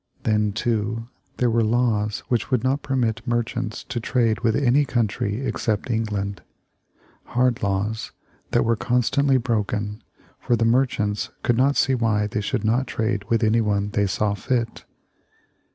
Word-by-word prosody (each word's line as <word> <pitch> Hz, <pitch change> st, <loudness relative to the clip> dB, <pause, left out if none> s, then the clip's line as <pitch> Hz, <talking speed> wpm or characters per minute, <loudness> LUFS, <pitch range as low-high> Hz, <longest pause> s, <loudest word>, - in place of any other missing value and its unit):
Then, 105 Hz, -1 st, +2 dB
too, 115 Hz, +1 st, -2 dB, 0.3 s
there 125 Hz, -2 st, +2 dB
were 115 Hz, +1 st, +3 dB
laws 110 Hz, -2 st, +1 dB
which 120 Hz, -4 st, -1 dB
would 125 Hz, -3 st, +1 dB
not 135 Hz, +2 st, +1 dB
permit 125 Hz, -4 st, 0 dB
merchants 120 Hz, -1 st, -2 dB
to 120 Hz, -, -4 dB
trade 115 Hz, -2 st, +1 dB
with 115 Hz, -2 st, +1 dB
any 140 Hz, +1 st, +3 dB
country 115 Hz, -2 st, -1 dB
except 110 Hz, -1 st, -1 dB
England; 100 Hz, -4 st, -2 dB, 0.8 s
hard 125 Hz, 0 st, +1 dB
laws, 105 Hz, +4 st, -1 dB, 0.4 s
that -, -, +2 dB
were 115 Hz, 0 st, +3 dB
constantly 125 Hz, +4 st, +2 dB
broken, 105 Hz, -3 st, -2 dB, 0.4 s
for 120 Hz, -, +1 dB
the 115 Hz, 0 st, +1 dB
merchants 115 Hz, -4 st, +1 dB
could 120 Hz, -, +2 dB
not 135 Hz, +4 st, +3 dB
see 135 Hz, -, +3 dB
why 110 Hz, -4 st, +1 dB
they 105 Hz, 0 st, -2 dB
should 110 Hz, +2 st, -2 dB
not 120 Hz, +4 st, +1 dB
trade 110 Hz, -3 st, -1 dB
with 115 Hz, 0 st, +2 dB
anyone 105 Hz, -2 st, +1 dB
they 100 Hz, -1 st, +1 dB
saw 105 Hz, +2 st, 0 dB
fit. 115 Hz, +2 st, -2 dB
115 Hz, 150 wpm, -23 LUFS, 105-125 Hz, 0.8 s, were